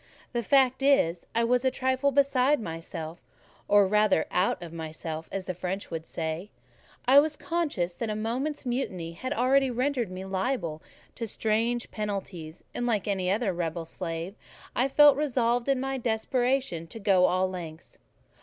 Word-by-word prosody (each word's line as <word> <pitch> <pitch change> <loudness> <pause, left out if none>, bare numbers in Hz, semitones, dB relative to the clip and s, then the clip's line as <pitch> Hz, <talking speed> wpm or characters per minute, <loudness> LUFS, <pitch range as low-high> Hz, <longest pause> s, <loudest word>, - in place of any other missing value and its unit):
The 240 - 0
fact 260 +2 +3
is, 225 -12 +3
I 230 - +3
was 245 +2 +2
a 260 - +4
trifle 260 +2 +1
beside 275 0 +3
myself; 165 -3 -6 0.5
or 205 -1 +6
rather 210 -3 +3
out 180 +1 +1
of 170 -1 -9
myself, 160 0 -6
as 195 -1 -4
the 185 - -3
French 185 +3 -4
would 165 -1 -5
say: 160 +4 -4 0.6
I 270 +2 +9
was 305 +1 +1
conscious 295 - -1
that 230 +4 -4
a 215 - -1
moment's 255 +8 -2
mutiny 190 -10 -2
had 255 +10 -6
already 270 0 +3
rendered 250 -2 0
me 185 +1 -6
liable 190 -5 -2 0.3
to 230 - -4
strange 225 +3 0
penalties, 190 -6 -5
and, 245 - -2
like 215 -4 0
any 190 -3 0
other 205 0 +1
rebel 170 -1 -3
slave, 165 +1 -5 0.4
I 255 - +2
felt 290 0 +6
resolved, 245 -4 +1
in 270 -2 +3
my 270 0 -2
desperation, 245 -5 0
to 225 - -9
go 195 -3 +4
all 185 +1 +2
lengths. 170 -3 -8
215 Hz, 165 wpm, -28 LUFS, 175-260 Hz, 0.6 s, I